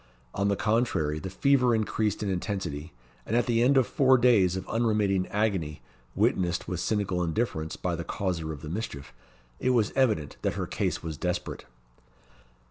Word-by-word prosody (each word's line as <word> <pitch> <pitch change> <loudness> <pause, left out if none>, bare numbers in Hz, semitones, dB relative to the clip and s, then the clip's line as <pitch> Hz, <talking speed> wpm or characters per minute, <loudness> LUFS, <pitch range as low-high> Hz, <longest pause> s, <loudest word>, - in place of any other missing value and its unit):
On 100 - 0
the 100 - +2
contrary, 105 -10 0
the 95 - -5
fever 125 +4 +3
increased 110 -1 -1
in 100 - -1
intensity; 90 -5 -3 0.3
and 110 - -2
at 120 - +3
the 115 -2 +2
end 135 +3 +4
of 130 - +5
four 130 +1 +4
days 110 -7 +4
of 95 0 -5
unremitting 105 -5 +1
agony, 95 - -1 0.3
witnessed 90 -1 +1
with 90 -3 -3
cynical 95 -4 0
indifference 80 -3 -2
by 90 -2 -2
the 85 - -4
causer 85 -4 -2
of 75 -3 -8
the - - -6
mischief, 75 -7 -5 0.5
it 130 - 0
was 110 -3 +2
evident 110 - +1
that - - 0
her - - -2
case - - -2
was 80 -2 -5
desperate. 90 -1 -3
100 Hz, 170 wpm, -28 LUFS, 85-115 Hz, 0.5 s, of